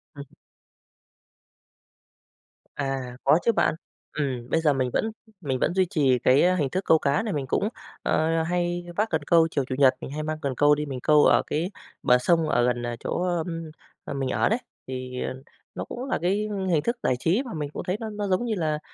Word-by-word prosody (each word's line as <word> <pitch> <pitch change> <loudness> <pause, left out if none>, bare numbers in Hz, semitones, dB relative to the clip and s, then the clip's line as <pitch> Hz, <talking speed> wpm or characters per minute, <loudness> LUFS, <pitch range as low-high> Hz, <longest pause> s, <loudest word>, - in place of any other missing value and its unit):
Ừm. 140 0 -8 2.5
À, 135 -3 -3
có 150 +5 +5
chứ 235 - +5
bạn. 160 - +1 0.4
Ừm, 130 -5 -2
bây 165 - +2
giờ 150 -3 +3
mình 130 -2 0
vẫn 220 - 0 0.3
mình 130 -4 -2
vẫn 175 - +1
duy 190 -1 +3
trì 130 -5 +2
cái, 130 +3 +4
ơ, 185 +1 +4
hình 145 -6 0
thức 185 +6 -2
câu 160 - +5
cá 140 +9 +1
này, 215 - -2
mình 140 -3 -2
cũng, 205 +9 0 0.3
ờ, 160 +1 +1
hay 175 0 -1
vác 215 +2 +1
cần 160 -2 0
câu 165 -1 +5
chiều 140 -3 0
Chủ 130 - -3
nhật 135 -2 +6
mình - - -6
hay 155 +1 -4
mang 155 0 -3
cần 135 -2 -2
câu 145 0 +5
đi 150 0 -3
mình 135 -3 -5
câu 150 -1 +5
ở - - +5
cái 170 +6 -1 0.3
bờ 125 - +5
sông 165 +3 +2
ở 120 0 +3
gần, 120 -1 0
à, 120 0 -3
chỗ, - - -3 0.2
ưm, 165 -2 -5 0.3
à, - - -5
mình 135 -1 -2
ở - - +2
đấy. 225 +3 +1 0.3
Thì 130 -1 -5 0.5
nó - - -3
cũng 250 +2 -6
là 270 - -1
cái 200 +4 +1 0.2
hình 155 -3 +3
thức 235 +1 -1
giải 125 - +2
trí 190 - +1
mà 235 - -6
mình 150 -2 -3
cũng - - -5
thấy 185 +3 -2
nó 220 -1 -4
nó 210 -1 -3
giống 190 +6 +1
như 220 -2 -1
là 155 -4 -1
155 Hz, 220 wpm, -25 LUFS, 135-180 Hz, 2.5 s, nhật